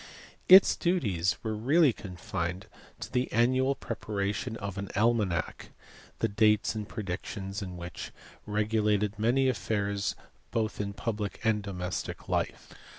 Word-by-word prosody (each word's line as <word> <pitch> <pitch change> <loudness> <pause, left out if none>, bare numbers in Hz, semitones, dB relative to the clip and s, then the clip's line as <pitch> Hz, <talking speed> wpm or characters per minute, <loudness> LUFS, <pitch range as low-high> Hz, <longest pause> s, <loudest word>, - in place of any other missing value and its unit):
Its 190 +1 +9
duties 100 - +1
were 110 - -1
really 140 +5 +4
confined 90 -1 -4 0.3
to - - -7
the 125 0 0
annual 130 +4 +3
preparation 110 -1 -3
of 100 -2 -5
an 100 - -4
almanadk, 105 -7 +1 0.5
the - - +1
dates 105 0 +3
and 110 -1 -5
predictions 95 0 -5
in 90 -2 -6
which 85 0 -7 0.4
regulated 105 0 +1
many 125 +5 +3
affairs 100 -5 -1 0.3
both 110 -2 -1
in 100 -1 -3
public 105 -1 -3
and 110 -2 +2
domestic 90 -3 -5
life. - - -2
105 Hz, 125 wpm, -29 LUFS, 100-115 Hz, 0.5 s, Its